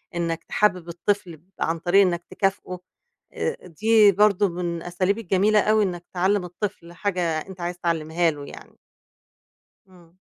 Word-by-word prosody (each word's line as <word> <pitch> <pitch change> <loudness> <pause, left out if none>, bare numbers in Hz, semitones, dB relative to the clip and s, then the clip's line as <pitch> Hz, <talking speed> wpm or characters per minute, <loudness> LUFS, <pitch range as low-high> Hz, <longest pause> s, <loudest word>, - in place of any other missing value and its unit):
إنَّك 165 -1 -2
تحبب 185 -5 0
الطفل 175 -2 -2 0.2
عن 165 +1 -1
طريق 175 +4 +4
إنَّك 175 -3 +1
تكافئه 195 -2 -2 0.5
آآ، 470 - -4
دي 210 +4 +4
برضه 205 0 +3
من 175 0 -3
الأساليب 180 +4 -1
الجميلة 205 +1 +2
أوي 215 +1 +3
إنَّك 175 -2 -3
تعلّم 190 +1 +1
الطفل 175 -1 -6
حاجة 185 0 -2 0.2
أنت 185 +2 -10
عايز 175 0 -3
تعلّمها 165 0 0
له 145 -1 -9
يعني. - - -13 1.1
إمم. 175 -2 -20
180 Hz, 140 wpm, -24 LUFS, 170-200 Hz, 1.1 s, طريق